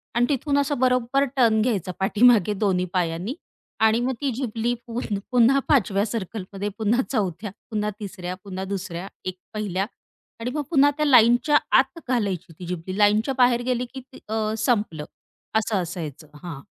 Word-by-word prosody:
आणि 240 Hz, -, +4 dB
तिथून 285 Hz, +1 st, +1 dB
असं 285 Hz, -2 st, 0 dB
बरोबर 255 Hz, +1 st, +2 dB
टर्न 220 Hz, -3 st, +4 dB
घ्यायचं 205 Hz, -7 st, 0 dB
पाठीमागे 210 Hz, 0 st, +4 dB
दोन्ही 185 Hz, -3 st, +2 dB
पायांनी 180 Hz, -, -1 dB, 0.4 s
आणि 220 Hz, +1 st, +4 dB
मग 265 Hz, -, 0 dB
ती 275 Hz, -2 st, 0 dB
झिबली 235 Hz, -1 st, -1 dB
पूर्ण 230 Hz, -3 st, -3 dB
पुन्हा 250 Hz, +3 st, +5 dB
5 265 Hz, -10 st, +3 dB
व्या 200 Hz, +2 st, +1 dB
सर्कलमध्ये 205 Hz, -2 st, -4 dB
पुन्हा 225 Hz, +3 st, +2 dB
चौथ्या 200 Hz, -3 st, -2 dB, 0.2 s
पुन्हा 210 Hz, -1 st, -1 dB
तिसऱ्या 185 Hz, -3 st, -6 dB
पुन्हा 190 Hz, -1 st, -5 dB
दुसऱ्या 185 Hz, -1 st, -5 dB, 0.2 s
एक 185 Hz, 0 st, -4 dB, 0.2 s
पहिल्या 195 Hz, -3 st, -1 dB, 0.6 s
आणि 245 Hz, +2 st, -2 dB
मग 300 Hz, -, -1 dB
पुन्हा 290 Hz, -3 st, +5 dB
त्या 300 Hz, -, +1 dB
लाईनच्या 250 Hz, +3 st, +5 dB, 0.2 s
आत 265 Hz, +5 st, +1 dB
घालायची 195 Hz, -8 st, -1 dB
ती 180 Hz, -, -7 dB
झिबली. 180 Hz, +1 st, -5 dB
लाईनच्या 210 Hz, +5 st, +3 dB
बाहेर 245 Hz, -1 st, +4 dB
गेली 250 Hz, -1 st, 0 dB
की 265 Hz, -, -7 dB, 0.3 s
अ, 220 Hz, -1 st, -1 dB
संपलं. 210 Hz, -, 0 dB, 0.5 s
असं 215 Hz, -3 st, +1 dB
असायचं. 160 Hz, -3 st, -6 dB, 0.2 s
हां. 165 Hz, -6 st, -6 dB
220 Hz, 160 wpm, -24 LUFS, 190-250 Hz, 0.6 s, पुन्हा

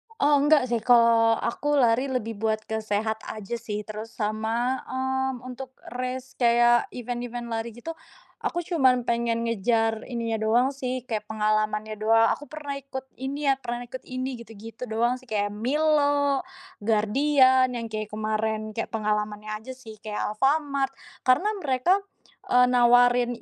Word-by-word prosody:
Oh 290 Hz, -4 st, +4 dB
enggak 295 Hz, -1 st, +5 dB
sih, 235 Hz, -, +2 dB
kalau 230 Hz, -1 st, +5 dB
aku 290 Hz, +5 st, -1 dB
lari 250 Hz, +2 st, +3 dB
lebih 225 Hz, -4 st, -3 dB
buat 220 Hz, -1 st, 0 dB
ke 220 Hz, 0 st, -2 dB
sehat 220 Hz, +1 st, -1 dB
aja 215 Hz, +1 st, -6 dB
sih, 210 Hz, -2 st, -4 dB
terus 215 Hz, +1 st, -7 dB
sama, 225 Hz, +4 st, -1 dB
mmm, 265 Hz, -1 st, -2 dB
untuk 255 Hz, +1 st, -8 dB, 0.2 s
race 255 Hz, +1 st, -4 dB
kayak 240 Hz, 0 st, +4 dB
event 245 Hz, 0 st, -4 dB
event 240 Hz, 0 st, -5 dB
lari 225 Hz, +1 st, -2 dB
gitu. 330 Hz, +7 st, -6 dB, 0.5 s
Aku 345 Hz, -, -1 dB
cuman 260 Hz, -7 st, +3 dB
pengen 235 Hz, 0 st, 0 dB
ngejar 225 Hz, 0 st, 0 dB
ini 230 Hz, -2 st, -2 dB
nya -, -, 0 dB
doang 240 Hz, +5 st, +2 dB
sih, 255 Hz, -2 st, -4 dB
kayak 215 Hz, -3 st, -3 dB
pengalamannya 215 Hz, 0 st, 0 dB
doang. 225 Hz, +1 st, +4 dB
Aku 295 Hz, -, -9 dB
pernah 295 Hz, -2 st, -6 dB
ikut 265 Hz, -1 st, -7 dB
ini 280 Hz, +3 st, -4 dB
ya, 270 Hz, -, +3 dB
pernah 240 Hz, 0 st, -4 dB
ikut 255 Hz, +2 st, -8 dB
ini. 255 Hz, 0 st, -4 dB
Gitu-gitu 225 Hz, +1 st, -9 dB
doang 235 Hz, +3 st, +1 dB
sih. -, -, -18 dB
Kayak 205 Hz, -1 st, 0 dB
Milo, 285 Hz, +3 st, +2 dB, 0.4 s
Guardian 255 Hz, +5 st, +4 dB
yang 230 Hz, -, -4 dB
kayak 215 Hz, -1 st, -4 dB
kemarin, 215 Hz, 0 st, -2 dB
kayak 225 Hz, -, -3 dB
pengalamannya 210 Hz, -1 st, -2 dB
saja 260 Hz, +3 st, -8 dB
sih, 225 Hz, -4 st, -12 dB
kayak 215 Hz, -1 st, -4 dB
Alfamart. 275 Hz, +2 st, +1 dB, 0.3 s
Karena 260 Hz, +12 st, +4 dB
mereka, 295 Hz, +3 st, +2 dB, 0.5 s
eee, 250 Hz, 0 st, +5 dB
nawarin, 245 Hz, 0 st, +4 dB
240 Hz, 155 wpm, -26 LUFS, 220-260 Hz, 0.5 s, enggak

